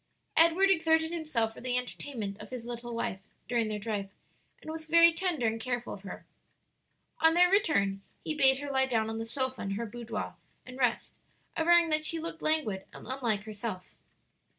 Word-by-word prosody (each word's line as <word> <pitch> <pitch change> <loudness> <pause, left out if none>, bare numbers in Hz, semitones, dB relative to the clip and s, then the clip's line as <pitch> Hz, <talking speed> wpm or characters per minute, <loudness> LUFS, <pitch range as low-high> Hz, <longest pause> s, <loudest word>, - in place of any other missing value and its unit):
Edward 335 +4 +5
exerted 320 -2 +3
himself 305 -10 -1
for - - -12
the 250 0 +1
entertainment 245 -4 -4
of - - -10
his 250 -2 -6
little 240 0 -6
wife 195 -4 -2 0.3
during 235 -2 +1
their 215 -1 -2
drive, 205 -2 -3 0.5
and 315 - -8
was 320 0 -6
very 335 +1 +6
tender 335 -7 -1
and 225 0 0
careful 245 0 -3
of 195 - -9
her. 190 -2 -9 0.9
On 325 0 +5
their 360 +1 +5
return, 200 - +2 0.2
he 315 - -2
bade 265 -3 +5
her 285 0 -5
lie 265 -1 +2
down 225 -3 0
on 225 - -4
the 225 - -4
sofa 260 +1 -2
in 195 - -3
her 235 +3 -3
boudoir 235 +1 -5 0.3
and 255 +1 -10
rest, 250 -3 0 0.4
averring 340 +1 +5
that 310 0 +2
she 330 +1 -1
looked 330 0 -6
languid 235 -12 0
and - - -12
unlike 235 -5 -1
herself. 210 -3 -6
255 Hz, 185 wpm, -30 LUFS, 225-320 Hz, 0.9 s, very